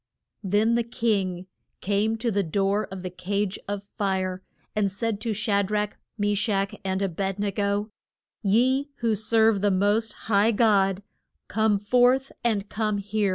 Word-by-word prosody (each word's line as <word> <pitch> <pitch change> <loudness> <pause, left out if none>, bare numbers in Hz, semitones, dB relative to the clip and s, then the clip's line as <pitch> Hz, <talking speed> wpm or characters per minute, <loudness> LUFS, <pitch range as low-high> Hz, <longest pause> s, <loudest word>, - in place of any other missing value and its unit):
Then 205 +4 +2
the 235 - +3
king 200 -6 -1 0.3
came 210 +3 0
to 230 +1 -1
the 200 0 +1
door 195 +4 0
of 190 -1 -7
the 185 - -4
cage 195 +2 -2
of 200 0 -3 0.2
fire 190 -2 -1 0.3
and 205 -2 +1
said 215 +1 -2
to 230 0 -1
Sha 205 -1 +1
drach, 210 +1 -1 0.2
Me 205 0 +1
shach 200 -1 0
and 190 0 -1
A - - +2
bed 195 +2 -3
ne 205 0 -1
go, 205 +2 -1 0.5
Ye 255 +7 +2
who 230 -2 +2
serve 220 0 +3
the 205 - +3
most 205 +3 +1
high 215 +1 +3
God, 200 -3 +3 0.4
come 220 -1 +2
forth, 250 +6 +3
and 210 -4 0
come 215 -1 -1
here. 205 0 0
205 Hz, 160 wpm, -25 LUFS, 195-220 Hz, 0.5 s, the